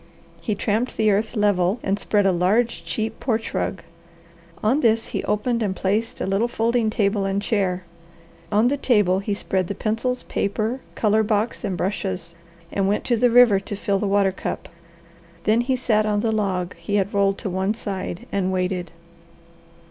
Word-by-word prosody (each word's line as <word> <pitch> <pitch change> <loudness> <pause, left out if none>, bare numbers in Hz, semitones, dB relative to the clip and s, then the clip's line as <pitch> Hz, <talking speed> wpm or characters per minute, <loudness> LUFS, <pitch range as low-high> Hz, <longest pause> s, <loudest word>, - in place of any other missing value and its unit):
He 215 - -1
tramped 220 +5 -1
the 215 -1 +3
earth 215 +4 0
level 205 0 +2
and 195 +1 0
spread 205 -1 +1
a 195 - +5
large 190 +4 +1
cheap 215 +7 -3
porch 225 -3 -1
rug. 185 - -2 0.8
On 240 +7 +3
this 225 -4 +2
he - - -3
opened 230 +3 0
and 200 -3 -1
placed 210 +5 -1
a - - -1
little 195 +5 +1
folding 230 -1 +1
table 205 -2 +1
and 195 0 0
chair. 195 -4 0 0.7
On 215 +3 +4
the 285 +3 +1
table 205 -9 +3
he 200 +1 -2
spread 190 -2 -1
the 200 - -4
pencils, 230 +5 -1
paper, 220 +6 -2
colour 215 0 +3
box 215 +1 0
and 195 -4 -2
brushes, 185 -2 -2 0.4
and 195 -1 0
went 205 +2 0
to 240 - +1
the 245 +2 +3
river 235 -4 +6
to 195 +1 -6
fill 200 0 0
the 205 - -1
water 200 -1 +3
cup. 190 - -5 0.7
Then 220 +2 +3
he 260 +2 0
sat 215 -4 +1
on 205 -1 +1
the 225 - +1
log 190 -4 -1
he 170 +5 -3
had 200 +1 0
rolled 195 -1 +2
to 200 - -4
one 190 +4 0
side 190 -5 -5
and 190 -1 0
waited. 180 -1 -1
205 Hz, 180 wpm, -23 LUFS, 195-225 Hz, 0.8 s, river